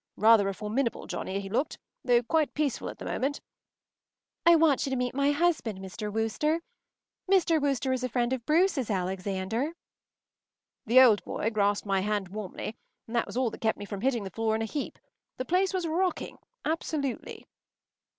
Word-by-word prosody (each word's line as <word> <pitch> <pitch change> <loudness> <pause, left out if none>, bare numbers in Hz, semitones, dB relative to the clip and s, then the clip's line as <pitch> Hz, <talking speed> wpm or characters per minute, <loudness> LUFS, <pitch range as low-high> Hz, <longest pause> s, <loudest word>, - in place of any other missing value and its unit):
Rather 215 -2 +6
a - - -2
formidable 230 +5 -2
Johnnie, 190 +1 -3
he 195 - -6
looked, 235 +9 -1 0.3
though 245 -1 +4
quite 310 +4 +1
peaceful 295 -4 -1
at - - -8
the - - -8
moment. 280 +2 -1 1.1
“I 340 - +9
want 315 -5 +4
you - - -2
to 265 - -1
meet 250 -1 -1
my 280 +1 +2
husband, 290 - +1
Mr. 195 +3 -6
Wooster. 225 +10 0 0.7
Mr. 340 -5 +4
Wooster 270 -2 +1
is 255 -1 -2
a 255 - -1
friend 240 +1 0
of 255 -3 -3
Bruce’s, 310 - +2
Alexander.” 190 - -2 1.1
The 250 +4 +8
old 225 -6 +6
boy 220 - -2
grasped 205 -1 +1
my 195 -1 +1
hand 205 -1 -1
warmly, 210 +2 -6 0.3
and 230 - -7
that 235 - +1
was - - -6
all 255 -3 +1
that - - -10
kept 220 -1 +1
me 205 - -7
from 200 -1 -6
hitting 245 -3 +1
the 190 - -6
floor 225 -1 0
in 225 - -1
a - - -1
heap. 285 +5 -4 0.4
The 255 - -3
place 365 +5 +2
was 370 -3 -1
rocking. 360 +3 -1 0.3
Absolutely. 305 -4 -3
240 Hz, 180 wpm, -28 LUFS, 210-290 Hz, 1.1 s, I